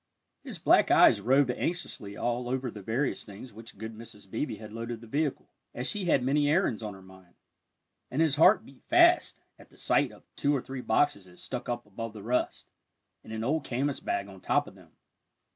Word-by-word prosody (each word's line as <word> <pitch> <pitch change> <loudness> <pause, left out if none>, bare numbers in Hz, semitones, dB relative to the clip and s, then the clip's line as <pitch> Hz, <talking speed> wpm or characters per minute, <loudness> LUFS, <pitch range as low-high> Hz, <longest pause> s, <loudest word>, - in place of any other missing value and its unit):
His - - -5
black - - +4
eyes - - +6
roved 130 +1 +4
anxiously 125 - -4
over - - -4
all 120 +2 -1
the 120 -5 -6
various 120 +8 -1
things 105 +4 -11
with - - -18
which 115 -2 -11
good 110 +2 -6
Mrs. 110 -3 -11
Beebe 115 +6 -3
had 105 0 -10
loaded 115 0 -5
the 115 - -12
vehicle, 145 +5 -2 0.2
as 125 - -3
she 205 -3 0
had 140 -7 +3
many 145 +3 +2
errands 150 - +2
on 105 -2 -5
her 95 - -14
mind, 95 -1 -17 0.7
and 130 - -3
his 160 -3 +3
heart 185 +7 +6
beat 135 - -17
fast 345 +1 +4 0.2
at - - -16
the - - -21
sight - - +2
of - - -16
two 145 +1 +1
or 135 - -1
three 130 -1 -6
boxes 110 -4 +1
that 90 -1 -17
stuck 125 -2 -5
up 120 0 -3
above 110 +2 -6
the 105 -2 -9
rest, 125 +3 -1 0.6
and - - -11
an 110 0 -3
old 150 +5 0
canvas 135 +2 -1
bag 100 0 -2
on 95 -2 -13
top - - +2
of - - -12
them. - - -18
120 Hz, 210 wpm, -29 LUFS, 110-140 Hz, 0.7 s, eyes